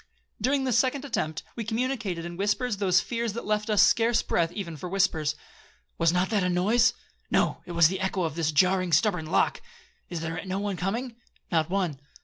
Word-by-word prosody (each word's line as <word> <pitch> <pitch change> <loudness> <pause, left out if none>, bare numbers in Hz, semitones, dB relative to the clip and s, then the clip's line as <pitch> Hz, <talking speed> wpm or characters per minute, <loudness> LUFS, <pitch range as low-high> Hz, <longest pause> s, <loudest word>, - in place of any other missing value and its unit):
During 270 +4 +1
this 250 -3 +2
second 265 +2 0
attempt, 165 - -2
we 230 - -3
communicated 220 -6 -2
in 175 0 -6
whispers 210 +4 0
those 190 -2 +3
fears 235 -2 -3
that 235 - -6
left 210 +1 -1
us 210 -2 +5
scarce 230 0 +3
breath 165 -1 0
even 175 -4 -5
for 175 +4 -7
whispers. 160 -6 +1 0.6
'Was 165 -1 +4
not 180 +3 0
that 210 -3 +2
a 180 - +1
noise?'—'No, 205 +7 +1
it 175 - -6
was 170 -1 +6
the 190 +2 -3
echo 190 -1 -1
of 160 -3 -2
this 160 -1 0
jarring, 185 +2 +2
stubborn 180 -3 +2
lock. 165 - +1 0.5
Is 170 -2 -4
there 165 0 -4
no 190 0 -3
one 200 -1 -2
coming?'—'Not 195 -5 -3
one.' 180 -7 -1
190 Hz, 185 wpm, -27 LUFS, 170-225 Hz, 0.6 s, was